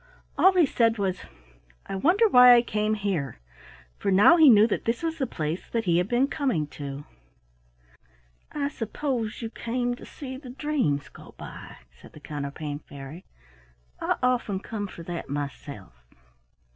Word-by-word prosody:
All 380 Hz, -, +6 dB
he 345 Hz, -, +6 dB
said 230 Hz, -4 st, +1 dB
was, 190 Hz, -2 st, -1 dB, 0.7 s
"I -, -, -5 dB
wonder 360 Hz, -, +3 dB
why 250 Hz, -, +8 dB
I 240 Hz, -, +4 dB
came 215 Hz, -1 st, -1 dB
here?" 195 Hz, -9 st, -3 dB, 0.6 s
for -, -, -1 dB
now 200 Hz, -, +7 dB
he 320 Hz, -4 st, +7 dB
knew 215 Hz, -3 st, +7 dB
that 225 Hz, -, -2 dB
this 230 Hz, +7 st, -1 dB
was 325 Hz, -1 st, -2 dB
the 265 Hz, -, 0 dB
place 155 Hz, -3 st, -4 dB
that 230 Hz, -2 st, -2 dB
he 170 Hz, -1 st, +3 dB
had 180 Hz, -, 0 dB
been 245 Hz, +4 st, +2 dB
coming 260 Hz, -, -1 dB
to. 140 Hz, 0 st, -7 dB, 1.5 s
"I 285 Hz, -1 st, -2 dB
suppose 235 Hz, -2 st, -3 dB
you 225 Hz, -, -5 dB
came 245 Hz, +1 st, -2 dB
to -, -, -12 dB
see 260 Hz, -2 st, -8 dB
the 260 Hz, -2 st, -11 dB
dreams 255 Hz, -, -1 dB
go -, -, -15 dB
by," -, -, -10 dB
said -, -, -17 dB
the -, -, -12 dB
Counterpane 145 Hz, 0 st, -5 dB
Fairy. 145 Hz, +4 st, -11 dB, 0.8 s
"I -, -, +1 dB
often 240 Hz, -6 st, +1 dB
come 205 Hz, 0 st, -5 dB
for 170 Hz, -, -10 dB
that 170 Hz, 0 st, -6 dB
myself." 140 Hz, -, -6 dB
215 Hz, 160 wpm, -26 LUFS, 155-255 Hz, 1.5 s, why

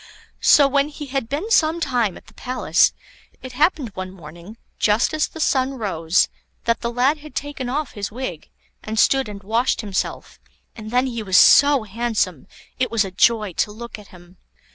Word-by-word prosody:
So, 285 Hz, -, +6 dB
when 280 Hz, +1 st, +1 dB
he 295 Hz, 0 st, -8 dB
had 265 Hz, -4 st, -3 dB
been 325 Hz, +11 st, -3 dB
some 325 Hz, -5 st, +3 dB
time 245 Hz, -, 0 dB
at -, -, -16 dB
the -, -, -19 dB
palace, 255 Hz, 0 st, +1 dB, 0.5 s
it 255 Hz, -, -7 dB
happened 290 Hz, -1 st, +1 dB
one 185 Hz, -1 st, -6 dB
morning, 175 Hz, +3 st, -12 dB, 0.2 s
just 215 Hz, +6 st, +2 dB
as 310 Hz, 0 st, +1 dB
the 320 Hz, -, -12 dB
sun 270 Hz, -3 st, +1 dB
rose, 185 Hz, -7 st, +1 dB, 0.4 s
that 230 Hz, 0 st, 0 dB
the 235 Hz, -, -2 dB
lad 260 Hz, +6 st, +1 dB
had 300 Hz, 0 st, -13 dB
taken 285 Hz, -3 st, -4 dB
off 290 Hz, +2 st, -2 dB
his 205 Hz, 0 st, -5 dB
wig, 210 Hz, -, -6 dB, 0.3 s
and 220 Hz, +1 st, -6 dB
stood 270 Hz, +1 st, +3 dB
and 200 Hz, -1 st, -9 dB
washed 230 Hz, +6 st, 0 dB
himself, 200 Hz, -4 st, -4 dB, 0.4 s
and 215 Hz, -2 st, -9 dB
then 250 Hz, +3 st, +2 dB
he 235 Hz, -3 st, -4 dB
was 190 Hz, -3 st, +2 dB
so 285 Hz, -3 st, +6 dB
handsome, 210 Hz, -, -2 dB, 0.3 s
it 255 Hz, -, +1 dB
was 225 Hz, -3 st, +1 dB
a 190 Hz, -, -7 dB
joy 210 Hz, 0 st, +2 dB
to 210 Hz, -, -2 dB
look 235 Hz, +1 st, -9 dB
at 205 Hz, -, -14 dB
him. 180 Hz, 0 st, -17 dB
235 Hz, 185 wpm, -21 LUFS, 205-275 Hz, 0.5 s, So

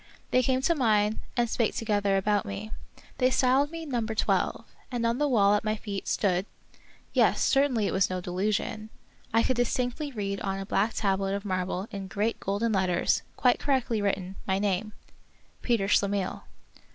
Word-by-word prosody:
They 255 Hz, -, +4 dB
came 260 Hz, +1 st, +1 dB
to 335 Hz, -, +4 dB
mine, 215 Hz, -6 st, +2 dB, 0.2 s
and 240 Hz, 0 st, +3 dB
spake 230 Hz, -1 st, 0 dB
together 205 Hz, -3 st, +1 dB
about 205 Hz, +1 st, +1 dB
me. 210 Hz, +1 st, -6 dB, 0.5 s
They 255 Hz, -1 st, +4 dB
styled 260 Hz, +2 st, +3 dB
me 330 Hz, 0 st, -7 dB
Number 235 Hz, -6 st, -2 dB
Twelve; -, -, 0 dB, 0.3 s
and 240 Hz, -2 st, -1 dB
on 230 Hz, +2 st, +1 dB
the 295 Hz, -, +2 dB
wall 205 Hz, -6 st, +4 dB
at 210 Hz, -, +1 dB
my 215 Hz, 0 st, 0 dB
feet 200 Hz, -2 st, -6 dB
stood 190 Hz, -1 st, +1 dB, 0.3 s
— -, -, -29 dB, 0.3 s
yes, -, -, +3 dB
certainly 270 Hz, -6 st, +2 dB
it -, -, -1 dB
was 190 Hz, 0 st, +2 dB
no 185 Hz, 0 st, -2 dB
delusion 205 Hz, +4 st, -2 dB, 0.2 s
— -, -, -31 dB
I 225 Hz, +1 st, +3 dB
could 255 Hz, -, +1 dB
distinctly 245 Hz, +4 st, -1 dB
read 200 Hz, -4 st, -3 dB
on 195 Hz, -1 st, -2 dB
a 195 Hz, -, -5 dB
black 210 Hz, +3 st, 0 dB
tablet 195 Hz, -1 st, 0 dB
of 200 Hz, +1 st, -5 dB
marble 185 Hz, 0 st, -2 dB
in 195 Hz, -2 st, -5 dB
great 210 Hz, +4 st, -1 dB
golden 205 Hz, +4 st, -1 dB
letters, 185 Hz, -3 st, +2 dB
quite 250 Hz, -1 st, +3 dB
correctly 255 Hz, -6 st, 0 dB
written, 195 Hz, -2 st, -2 dB
my 190 Hz, 0 st, +2 dB
name, 205 Hz, +1 st, -1 dB, 0.3 s
— -, -, -35 dB
PETER 230 Hz, -5 st, +1 dB
SCHLEMIHL. 200 Hz, -2 st, 0 dB
210 Hz, 185 wpm, -28 LUFS, 195-240 Hz, 0.5 s, They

